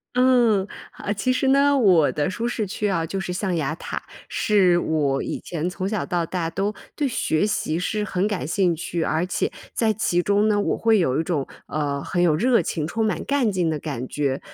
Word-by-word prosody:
嗯， 240 Hz, -6 st, +4 dB, 0.2 s
啊， 205 Hz, -, -5 dB
其 215 Hz, +5 st, 0 dB
实 265 Hz, +1 st, 0 dB
呢， 280 Hz, +1 st, +4 dB
我 185 Hz, -, +4 dB
的 150 Hz, +2 st, -1 dB
舒 230 Hz, +5 st, -3 dB
适 220 Hz, -4 st, -2 dB
区 210 Hz, +2 st, -2 dB
啊 170 Hz, -4 st, 0 dB
就 190 Hz, +4 st, -3 dB
是 180 Hz, -1 st, -3 dB
象 185 Hz, -1 st, -1 dB
牙 155 Hz, -1 st, -1 dB
塔。 -, -, -5 dB, 0.3 s
是 190 Hz, -5 st, +3 dB
我 145 Hz, -5 st, 0 dB
以 -, -, -4 dB
前 170 Hz, 0 st, -4 dB
从 190 Hz, +1 st, -3 dB
小 215 Hz, -4 st, -2 dB
到 175 Hz, -1 st, -1 dB
大 165 Hz, -1 st, -3 dB
都 200 Hz, +2 st, -1 dB, 0.2 s
对 290 Hz, -3 st, 0 dB
学 205 Hz, -5 st, 0 dB
习 165 Hz, -5 st, -1 dB
是 210 Hz, +3 st, -1 dB
很 195 Hz, 0 st, 0 dB
感 195 Hz, -10 st, -2 dB
兴 180 Hz, -1 st, +2 dB
趣， 170 Hz, +1 st, -3 dB
而 160 Hz, +2 st, 0 dB
且 185 Hz, -, -1 dB, 0.2 s
在 225 Hz, -2 st, +2 dB
其 185 Hz, -4 st, +1 dB
中 205 Hz, +3 st, +2 dB
呢， 205 Hz, -1 st, +2 dB
我 -, -, 0 dB
会 225 Hz, -2 st, +3 dB
有 135 Hz, -4 st, +1 dB
一 -, -, +1 dB
种， 155 Hz, -5 st, -2 dB, 0.2 s
呃， 145 Hz, -2 st, -2 dB
很 175 Hz, -, -1 dB
有 165 Hz, -4 st, +4 dB
热 235 Hz, +3 st, +3 dB
情、 155 Hz, -1 st, -2 dB
充 220 Hz, +7 st, -1 dB
满 195 Hz, -7 st, -1 dB
干 275 Hz, -6 st, +1 dB
劲 175 Hz, -4 st, 0 dB
的 150 Hz, -, -2 dB
感 135 Hz, -5 st, -5 dB
觉。 140 Hz, -2 st, -1 dB
185 Hz, 230 characters per minute, -23 LUFS, 160-215 Hz, 0.3 s, 嗯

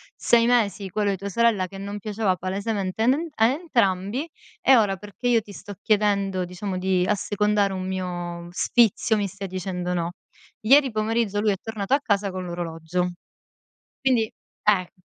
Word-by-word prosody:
6 235 Hz, -1 st, +3 dB
mesi 210 Hz, -5 st, +1 dB
quello 205 Hz, +2 st, 0 dB
di 195 Hz, -, 0 dB
tua 200 Hz, +2 st, -6 dB
sorella 215 Hz, -3 st, +2 dB
che 195 Hz, -, -10 dB
non 200 Hz, +1 st, -5 dB
piaceva 210 Hz, -3 st, 0 dB
palesemente 195 Hz, +2 st, -3 dB
a -, -, +3 dB
nen 305 Hz, +6 st, +2 dB
a 225 Hz, 0 st, +4 dB
entrambi, 245 Hz, -, 0 dB, 0.3 s
e 265 Hz, -2 st, +6 dB
ora 200 Hz, -3 st, +2 dB
perché 210 Hz, +5 st, -6 dB
io 235 Hz, -2 st, +4 dB
ti 205 Hz, -, -13 dB
sto 205 Hz, +1 st, -9 dB
chiedendo 200 Hz, -3 st, +1 dB
diciamo 185 Hz, +1 st, -5 dB
di 185 Hz, -1 st, +1 dB
assecondare 205 Hz, 0 st, +1 dB
un 185 Hz, 0 st, -4 dB
mio 175 Hz, -2 st, -4 dB
sfizio, 220 Hz, +2 st, +2 dB
mi 200 Hz, -1 st, 0 dB
stai 195 Hz, +1 st, -7 dB
dicendo 180 Hz, -1 st, -3 dB
no". 170 Hz, 0 st, -1 dB, 0.5 s
Ieri 270 Hz, +3 st, +5 dB
pomeriggio 215 Hz, -1 st, 0 dB
lui 210 Hz, -1 st, +2 dB
è 195 Hz, -, -1 dB
tornato 220 Hz, +1 st, -3 dB
a -, -, +1 dB
casa 200 Hz, -6 st, 0 dB
con 185 Hz, -1 st, -5 dB
l'orologio. 175 Hz, +1 st, -3 dB, 0.9 s
Quindi 250 Hz, -5 st, +2 dB, 0.4 s
eh, 195 Hz, -4 st, +2 dB
200 Hz, 165 wpm, -24 LUFS, 185-220 Hz, 0.9 s, e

